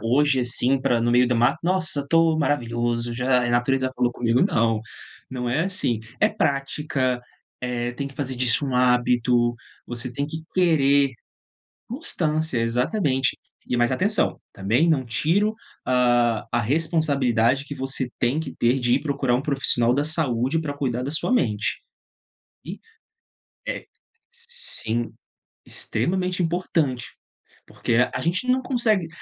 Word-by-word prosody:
hoje 135 +5 +2
assim 125 +2 +2
para 130 -3 +1
no 120 +1 +1
meio 125 +1 +4
do 125 - 0
mato: 120 +1 +2
"Nossa 180 -5 +1
estou 165 +2 +2
maravilhoso, 120 -4 -1
já 125 +1 +1
a 120 - -1
natureza 130 +2 +1
falou 125 -1 +1
comigo", 120 +1 +1
não, 115 - +1 0.5
não 125 -2 -4
é 160 +8 +1
assim, 185 - -1 0.2
é - - +5
prática, 140 -2 -1 0.4
eh, 120 -1 -2
tem 140 +2 -5
que 140 - -10
fazer 130 -2 -3
disso 125 +2 +3
um 130 -2 -1
hábito, 125 -1 +2 0.3
você 120 +1 -3
tem 140 +2 -2
que 160 +1 -7
querer 140 -6 +3 0.8
constância 160 - -1
exatamente 130 - 0 0.3
e - - -2
mais 120 +1 +2
atenção, 205 +11 +1
também 110 - +1
não 140 -5 +2
tiro 175 - +1 0.3
a 120 -3 +2
a 120 - +2
responsabilidade 140 -3 +1
que 145 - -7
você 135 -1 -1
tem 125 +5 +1
que 160 - -5
ter 120 +3 +1
de 120 -1 +2
ir 135 - +1
procurar 140 -4 0
um 125 - +1
profissional 135 -4 +1
da 145 +2 +1
saúde 150 -2 +1
para 150 -3 -4
cuidar 125 -3 -2
da 135 - -3
sua 160 +10 0
mente, 110 - 0 0.8
e - - -7 0.9
eh, - - -4 0.5
sim, 470 - -2 0.5
extremamente 180 +9 -1
importante, 165 -7 -1 0.6
porque 115 - -2 0.2
a - - -3
gente 175 +8 0
não 255 +1 +3
consegue 225 -9 +1
130 Hz, 145 wpm, -23 LUFS, 120-155 Hz, 0.9 s, é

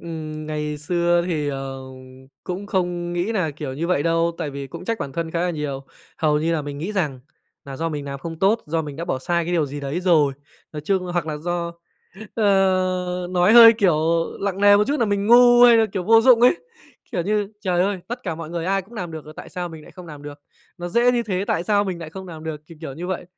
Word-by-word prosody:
Ừm, 155 -2 -6
ngày 150 -1 -3
xưa 175 +2 +1
thì, 155 -5 -1
ờ, 135 -1 -5 0.6
cũng 185 +3 -5
không 175 -3 -2
nghĩ 175 +6 -1
nà, 185 -8 0
kiểu, 145 -2 -6
như 160 +5 -3
vậy 175 -5 +1
đâu, 165 +1 +1
tại 160 -4 -3
vì 140 0 -6
cũng 170 +6 -9
trách 230 +2 -2
bản 140 -5 -5
thân 165 +2 -3
khá 170 - -2
là 180 0 0
nhiều. 145 -4 -5 0.3
Hầu 150 -2 +2
như 160 +2 0
là 160 -2 -1
mình 145 -1 -6
nghĩ 175 +8 -4
rằng 150 -10 -2 0.4
là 135 -1 -8
do 165 +2 -2
mình 150 -3 -5
làm 140 0 -6
không 165 +3 -7
tốt, 205 +6 +2
do 160 +1 -1
mình 145 -2 -8
đã 165 - -4
bỏ 150 - -2
sai 170 +5 -1
cái 175 - -3
điều 165 -4 +1
gì 145 +1 -6
đấy 140 +5 -3
rồi. 160 -6 +3 0.4
Nói 150 - -5
chung 190 +2 +1
hoặc 175 -3 -1
là 155 -1 -3
do 170 +2 -3 0.6
ờ, 185 -3 +1
nói 180 +3 +3
hơi, 230 -1 +10
kiểu, 180 -8 +3 0.4
lặng 195 -1 -2
nề 205 0 +7
một 210 - +3
chút 290 -1 -1
là 230 - +3
mình 200 0 -1
ngu 240 +1 +7
hay 240 -1 +8
là, 225 -1 +4
kiểu, 190 - -2
vô 225 +3 +6
dụng 235 0 +6
ấy. 250 +7 +5 0.6
Kiểu 175 - -1
như, 210 +2 0
trời 180 -3 0
ơi, 195 0 -1
tất 245 +2 -5
cả 170 -7 -3
mọi 160 -1 -8
người 170 -1 -3
ai 195 +2 0
cũng 210 +6 -17
nàm 180 -6 -5
được 160 -1 -7
rồi 155 - -12
tại - - -9
sao 180 -1 -5
mình 160 -2 -10
lại - - -14
không 180 -2 -11
làm 150 -3 -10
được, 145 0 -9 0.4
nó 175 0 -5
dễ 240 +6 +3
như 240 -1 +1
thế, 195 -3 -2
tại 170 - -1
sao 205 0 +2
mình 185 -3 -4
nại 165 -2 -8
không 190 +2 -9
làm 160 -2 -9
được, 155 -2 -5
thì, 165 - -13
kiểu, 150 -5 -6
như 170 +5 -6
vậy. 185 -1 -3
175 Hz, 260 wpm, -22 LUFS, 155-195 Hz, 0.6 s, hơi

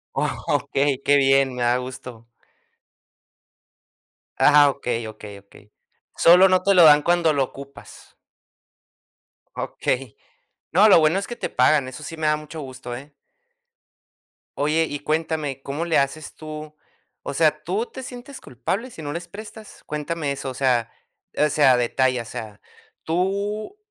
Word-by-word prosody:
Okey, 140 -1 -1
qué 145 - +5
bien, 135 -1 +3
me 125 - -5
da 120 +1 +2
gusto. 125 -2 -9 2.1
Ah, 145 -1 +6
okey, 120 -5 -3
okey, 105 -2 -10
okey. 100 +1 -20 0.4
Solo 180 +3 +7
no 185 -1 +2
te 200 - +3
lo 180 -2 +7
dan 150 -2 +8
cuando 170 -2 +2
lo 140 -2 +2
ocupas. 140 +1 -12 1.4
Okey. 125 -3 -3 0.6
No, 200 +6 +6
lo 195 - +7
bueno 160 +4 +3
es 200 - -6
que 240 - -6
te - - -4
pagan, 130 +1 +3
eso 140 +4 -10
sí 165 - -7
me 155 -1 -1
da 150 - +2
mucho 150 +1 -9
gusto, 130 -2 -8
¿eh? 140 +4 -11 1.4
Oye, 150 +3 +1
y 145 - -4
cuéntame, 155 -3 -2
¿cómo 145 +5 -4
le 170 - +1
haces 140 +2 -2
tú? 155 -1 -9 0.5
O - - -5
sea, 155 0 +1
¿tú 195 +8 -2
te 260 - -10
sientes 250 +2 -10
culpable 190 - -4
si 165 - -10
no 145 -1 -5
les 170 +1 -7
prestas? 215 +3 -11
Cuéntame 150 -1 -3
eso, 135 -1 -6
o - - -6
sea, 125 -3 0 0.5
o 150 - +3
sea, 135 -4 +4
detalla, 125 0 0
o - - -17
sea, 110 -2 -8 0.4
¿tú? 200 - -2
150 Hz, 150 wpm, -22 LUFS, 130-170 Hz, 2.1 s, dan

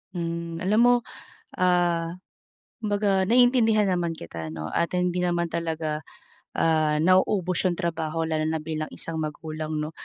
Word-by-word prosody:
Mm. 170 0 -4
Alam 210 +4 +2
mo, 245 +1 +6 0.6
ah, 175 -2 +2 0.7
kumbaga 205 -3 +1
naiintindihan 230 -2 +4
naman 175 -2 0
kita 85 - -7
'no 80 0 -5
at 170 +1 -1
hindi 180 0 0
naman 175 -1 0
talaga, 160 -2 -3 0.5
ah, 155 -2 +2
nauubos 185 0 +2
'yung 180 - +2
trabaho 165 -2 -2
lalo 155 -1 0
na 160 0 -1
bilang 155 -1 -4
isang 165 -1 -4
magulang, 155 0 -5
'no. 150 - -4
170 Hz, 135 wpm, -25 LUFS, 160-185 Hz, 0.7 s, mo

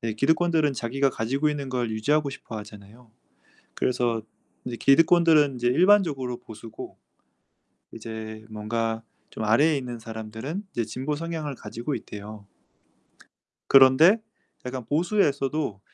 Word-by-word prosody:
네 115 -2 -3
기득권들은 160 +3 +2
자기가 135 +2 0
가지고 135 +7 -1
있는 145 -2 -3
걸 125 -3 -2
유지하고 140 +7 +1
싶어 115 -4 -9
하잖아요. 105 +2 -13 0.6
그래서 120 -3 0 0.4
이제 120 -1 -5
기득권들은 155 0 +4
이제 120 - -2
일반적으로 150 -4 +3
보수고 110 -1 -10 1.0
이제 110 -1 -8
뭔가 110 +1 -2 0.3
좀 110 - -5
아래에 145 +9 +4
있는 125 -3 -5
사람들은 110 - -6
이제 120 - -1
진보 130 +7 -3
성향을 160 -2 -4
가지고 120 +4 -5
있대요. 105 -2 -9 1.2
그런데 135 - +7 0.5
약간 125 -1 -5
보수에서도 150 - 0
125 Hz, 310 characters per minute, -25 LUFS, 110-150 Hz, 1.2 s, 그런데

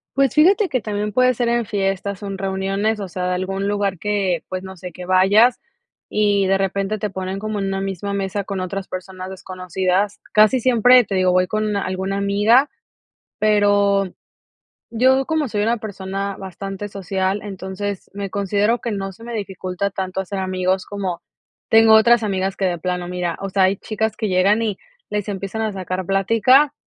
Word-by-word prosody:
Pues, 275 -3 +2
fíjate 380 +6 +5
que 255 -3 0
también 210 0 -3
puede 255 +3 +3
ser 240 0 0
en 235 -1 +1
fiestas 195 -1 -2
o 200 - -5
en 195 -1 -4
reuniones, 195 +3 -1
o 195 - -4
sea, 180 0 -3
de - - 0
algún 195 +2 -2
lugar 200 -2 0
que, 195 -4 -1
pues, 185 0 -4
no 190 -1 -10
sé, 180 +1 -8
que 180 +2 -9
vayas 200 +6 +5 0.5
y 205 -2 +2
de 195 0 +2
repente 195 +2 -1
te 210 - -2
ponen 190 +1 -4
como 215 0 -3
en 195 - -1
una 195 0 -2
misma 195 +1 -3
mesa 200 0 -2
con 195 -1 -4
otras 190 +1 -4
personas 185 0 -7
desconocidas. 185 +1 -2
Casi 215 +4 +5
siempre, 250 0 +5
te 195 -1 -4
digo, 185 -1 +3
voy 185 0 +3
con 215 +1 -1
una 205 -2 -1
alguna 190 +1 -2
amiga, 205 +7 +3 0.7
pero 205 -2 +3 0.8
yo, 260 +3 +3
como 315 -3 0
soy 210 -2 -1
una 235 +2 +1
persona 195 -1 -4
bastante 195 +2 -6
social, 190 0 -2
entonces 195 0 -5
me 200 -1 -4
considero 205 +4 +1
que 235 - -3
no 195 -1 -4
se 225 - -15
me 235 0 -7
dificulta 190 -2 -3
tanto 190 -1 -4
hacer 195 +1 -4
amigos 185 0 -1
como, 190 -4 -4 0.5
tengo 225 0 +6
otras 230 +1 +6
amigas 195 -1 -1
que 195 - 0
de 175 -1 0
plano 180 +1 -3
mira, 180 -1 -3
o 195 0 -4
sea, 190 0 +2
hay 190 +1 +3
chicas 220 0 -3
que 220 - -1
llegan 195 +4 +3
y 215 -4 -1 0.3
les 210 -1 -2
empiezan 195 +2 -4
a 215 -1 -1
sacar 185 -1 -4
plática 230 +9 +4
195 Hz, 190 wpm, -20 LUFS, 190-215 Hz, 0.8 s, tengo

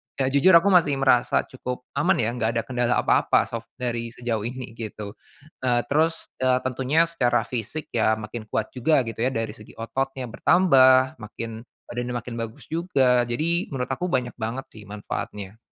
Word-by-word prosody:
ya 135 - 0
jujur 155 +6 +6
aku 195 +4 +6
masih 160 -6 +4
merasa 130 -3 +3
cukup 125 -1 -6 0.2
aman 175 +6 +3
ya 115 0 0
enggak 115 -2 -1
ada 115 - 0
kendala 125 0 0
apa-apa - - +3
sok 115 0 -7
dari 120 -2 -3
sejauh 120 -2 -2
ini 125 -1 -7
gitu, 105 -2 -6 0.5
eee, 120 -1 +2
terus, 160 +2 +1
eee, 130 0 +3
tentunya 130 +5 +2
secara 120 -8 +1
fisik 125 +6 -5
ya 110 -1 +2
makin 110 0 -7
kuat 110 - -2
juga 130 +2 +2
gitu 115 - -6
ya, - - +3
dari 115 -1 -2
segi 105 -1 -14
ototnya 130 +3 -3
bertambah 130 -4 +4
makin 115 +1 -7 0.3
badannya 120 0 -3
makin 115 +1 -8
bagus 115 -1 -6
juga, 135 -8 +2
jadi 165 +8 0
menurut 125 -2 -3
aku 180 +7 -2
banyak 125 -3 0
banget 115 +5 -3
sih 110 -1 -12
manfaatnya. 105 0 -6
125 Hz, 170 wpm, -24 LUFS, 115-135 Hz, 0.5 s, jujur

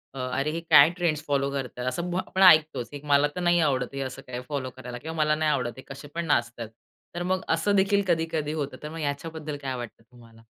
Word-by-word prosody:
अ, - - -6
"अरे, 140 +3 0
हे 165 - -3
काय 145 +3 +8
ट्रेंड्स 155 -3 0
फॉलो 140 -1 +1
करतात," 125 -2 -4
असं 175 +6 -2
म्ह 180 +1 -1
आपण 190 - -2
ऐकतोच. 155 -8 +5
की 145 - -8
मला 145 0 +4
तर - - -3
नाही 175 0 +3
आवडत 130 -1 -1
हे 135 - -4
असं 130 -1 -5
काय 125 0 -5
फॉलो 135 -3 -3
करायला 125 -1 -7
किंवा 160 +6 -7
मला 150 0 +2
नाही 155 -1 +1
आवडत, 125 -4 -1
हे - - -8
कसे 135 +1 -9
पण 170 0 -2
नाचत 120 -5 0
आहेत. 115 -2 -5 0.5
तर 175 - -2
मग 185 - +1
असं 200 +5 +1
देखील 200 +1 +3
कधी-कधी 160 -3 0
होतं. 145 -3 -4
तर 150 - -5
मग 165 +1 -7
याच्याबद्दल 150 +1 -4
काय 130 -1 -2
वाटतं 120 -2 -8
तुम्हाला? 115 -2 -17
145 Hz, 240 wpm, -26 LUFS, 130-165 Hz, 0.5 s, काय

